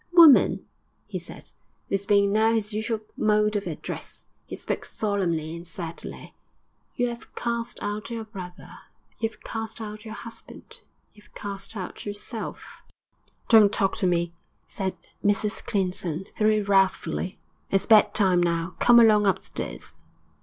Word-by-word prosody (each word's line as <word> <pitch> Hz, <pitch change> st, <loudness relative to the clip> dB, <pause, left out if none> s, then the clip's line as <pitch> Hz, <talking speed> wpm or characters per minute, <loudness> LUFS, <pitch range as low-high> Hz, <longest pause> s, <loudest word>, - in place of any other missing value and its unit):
'Woman,' 330 Hz, -5 st, +7 dB, 0.4 s
he -, -, -5 dB
said, -, -, -10 dB, 0.4 s
this 195 Hz, 0 st, -1 dB
being 200 Hz, -1 st, +4 dB
now 220 Hz, +1 st, +4 dB
his 215 Hz, -1 st, 0 dB
usual 220 Hz, +1 st, -2 dB
mode 210 Hz, 0 st, +2 dB
of 205 Hz, -, -1 dB
address -, -, -7 dB, 0.2 s
he -, -, -6 dB
spoke -, -, -3 dB
solemnly 170 Hz, -7 st, -1 dB
and 170 Hz, +1 st, -9 dB
sadly 165 Hz, -1 st, -7 dB, 0.6 s
'you 245 Hz, -1 st, 0 dB
'ave 235 Hz, -, -9 dB
cast 235 Hz, 0 st, -3 dB
out 205 Hz, +2 st, -3 dB
your 230 Hz, -1 st, -4 dB
brother, 185 Hz, -5 st, -10 dB, 0.4 s
you 225 Hz, -, 0 dB
'ave -, -, -19 dB
cast 225 Hz, 0 st, -5 dB
out 215 Hz, -1 st, -7 dB
your 215 Hz, -1 st, -7 dB
husband, 230 Hz, +1 st, -10 dB, 0.3 s
you 210 Hz, -, -18 dB
'ave -, -, -24 dB
cast 200 Hz, +1 st, -5 dB
out 185 Hz, -, -6 dB
yourself.' 205 Hz, +2 st, -6 dB, 0.7 s
'Don't 215 Hz, -3 st, +7 dB
talk 195 Hz, -3 st, +1 dB
to 190 Hz, -, +1 dB
me!' 170 Hz, -1 st, 0 dB, 0.3 s
said 190 Hz, -2 st, -3 dB, 0.3 s
Mrs 205 Hz, +1 st, +1 dB
Clinton, 185 Hz, -4 st, -2 dB
very 215 Hz, -1 st, +3 dB
wrathfully. 195 Hz, -1 st, +1 dB, 0.3 s
'It's 195 Hz, -, +2 dB
bed 215 Hz, -2 st, +6 dB
time 185 Hz, -4 st, +4 dB
now; 170 Hz, 0 st, 0 dB
come 240 Hz, -1 st, +7 dB
along 210 Hz, -3 st, +6 dB
upstairs.' 70 Hz, -, -3 dB
205 Hz, 145 wpm, -26 LUFS, 190-220 Hz, 0.7 s, Woman